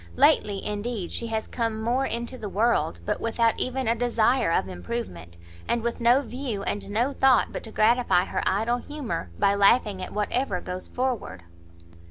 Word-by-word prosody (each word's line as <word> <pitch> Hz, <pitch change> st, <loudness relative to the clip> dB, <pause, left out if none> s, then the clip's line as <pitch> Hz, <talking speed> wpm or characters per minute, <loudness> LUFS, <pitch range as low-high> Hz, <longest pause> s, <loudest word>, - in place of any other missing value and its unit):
Lately, 200 Hz, -, +3 dB
indeed, 210 Hz, -2 st, -3 dB
she 235 Hz, -, -3 dB
has 220 Hz, -1 st, -2 dB
come 225 Hz, -2 st, -2 dB
more 245 Hz, +4 st, 0 dB
into 235 Hz, +2 st, -3 dB
the 215 Hz, -5 st, -6 dB
world, 205 Hz, -, +1 dB
but -, -, -2 dB
without 230 Hz, 0 st, +1 dB
even 255 Hz, 0 st, -1 dB
a 230 Hz, -, +4 dB
desire 235 Hz, -2 st, +2 dB
of 95 Hz, -, +1 dB
improvement, 90 Hz, -2 st, -6 dB, 0.3 s
and 235 Hz, -1 st, 0 dB
with 235 Hz, 0 st, -2 dB
no 245 Hz, +4 st, +4 dB
view 245 Hz, -5 st, -4 dB
and 205 Hz, -, -3 dB
no 240 Hz, +7 st, 0 dB
thought 265 Hz, -2 st, +3 dB
but -, -, -4 dB
to 220 Hz, -, -8 dB
gratify 220 Hz, -5 st, +3 dB
her -, -, -2 dB
idle 225 Hz, +5 st, +1 dB
humour 260 Hz, -, -5 dB
by 200 Hz, -, +3 dB
laughing 200 Hz, -1 st, +3 dB
at 185 Hz, -, -6 dB
whatever 210 Hz, -1 st, -1 dB
goes 180 Hz, +1 st, -6 dB
forward." 245 Hz, -, -3 dB
225 Hz, 175 wpm, -26 LUFS, 200-245 Hz, 0.3 s, a